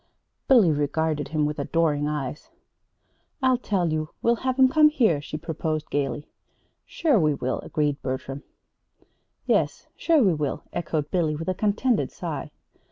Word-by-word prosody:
Billy 230 -11 +6
regarded 150 0 -1
him 150 +1 0
with 150 +1 -3
adoring 150 -1 +1
eyes. 150 - -4 0.9
"I'll 255 -1 +3
tell 180 -9 0
you; 155 -1 -2
we'll 235 0 +3
have 260 +1 -2
'em 265 -1 +7
come 305 +3 +5
here," 220 - +2
she 155 - -6
proposed 155 -1 -3
gayly. 145 +1 -2 0.6
"Sure 300 -9 +2
we 155 -3 +2
will," 130 -1 -2
agreed 145 -2 -1
Bertram. 130 +1 -4 1.0
"Yes; - - 0
sure 320 -5 +3
we 190 -5 +4
will," 150 -3 -3
echoed 155 -3 -2
Billy, 160 -4 +1
with 165 +4 -4
a - - +1
contented 215 +4 +1
sigh. - - -5
160 Hz, 150 wpm, -25 LUFS, 150-215 Hz, 1.0 s, em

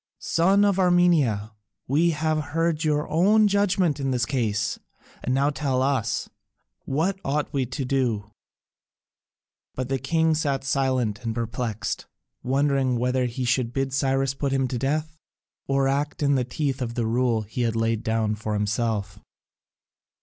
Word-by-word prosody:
"Son 195 +5 +3
of 200 -2 +2
Armenia, 170 - +3 0.4
we 155 +6 +3
have 155 0 0 0.2
heard 165 -1 +1
your 150 -1 +1
own 210 +6 +4
judgment 190 -6 +1
in 135 -1 -1
this 125 -2 +1
case, 110 -5 -1 0.4
and - - -1
now 140 +3 +2
tell 135 -3 0
us, 130 -5 0 0.6
what 170 +8 0
ought 145 +2 -1
we 135 -3 0
to 130 +2 -4
do?" 120 -6 -1 1.4
But 130 0 -3
the 135 -1 0
king 160 +3 +2
sat 140 -4 -1
silent 130 -5 0
and 115 -1 -2
perplexed, 115 -1 -3 0.3
wondering 135 -1 +1
whether 125 +1 +1
he 125 +2 -3
should 125 -1 0
bid 135 -1 -1
Cyrus 135 0 +1
put 140 0 -2
him 135 -1 +1
to 125 - -2
death, 155 +4 -2 0.5
or 135 0 +2
act 145 +2 -1
in 140 0 +3
the 130 -2 +2
teeth 135 +1 -2
of 120 -1 -3
the 120 - 0
rule 115 -1 +1
he 110 +4 -5
had 115 -2 0
laid 115 -1 0
down 110 -1 0
for 105 0 -3
himself. 105 -1 -1
135 Hz, 155 wpm, -25 LUFS, 115-150 Hz, 1.4 s, own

